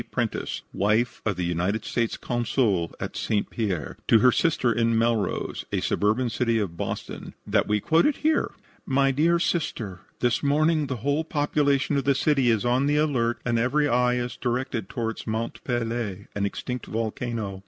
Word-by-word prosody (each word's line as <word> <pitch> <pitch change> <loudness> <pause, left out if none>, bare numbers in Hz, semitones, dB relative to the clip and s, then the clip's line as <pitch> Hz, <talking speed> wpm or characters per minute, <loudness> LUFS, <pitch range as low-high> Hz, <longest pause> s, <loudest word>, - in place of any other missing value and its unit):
Prentis, - - -2
wife 110 +4 +1
of 105 - +1
the 90 0 -2
United 90 +5 -1
States 115 -2 -1
Consul 115 -7 0
at - - -5
St. 105 -2 -1
Pierre, 100 -8 -2
to 115 - +6
her 125 +3 +5
sister 130 -4 +2
in 115 -1 +2
Melrose, 115 -4 0
a - - +1
suburban 110 +5 +1
city 115 0 +1
of 100 -6 -2
Boston, - - -5
that - - +1
we 105 0 +2
quote 160 - +3
it 300 - 0
here: 315 0 +3 0.3
"My 135 0 +2
Dear 165 +5 +3
Sister: 120 - -2 0.2
This 120 -1 +1
morning 155 +1 +2
the 130 -3 -5
whole 145 +3 +2
population 145 -2 +1
of 140 - 0
the 140 -1 +3
city 135 -3 +2
is 110 0 +2
on 125 +3 +2
the 145 +1 +2
alert 125 -6 +1
and 120 -1 +1
every 145 +5 +2
eye 125 -1 +2
is 125 0 -3
directed 125 -3 -2
toward 115 -2 -3
Mont 110 +1 -3
Pelee, 115 -5 -2
an 100 0 0
extinct 125 +4 -5
volcano. 110 -2 -3
120 Hz, 175 wpm, -25 LUFS, 110-140 Hz, 0.3 s, to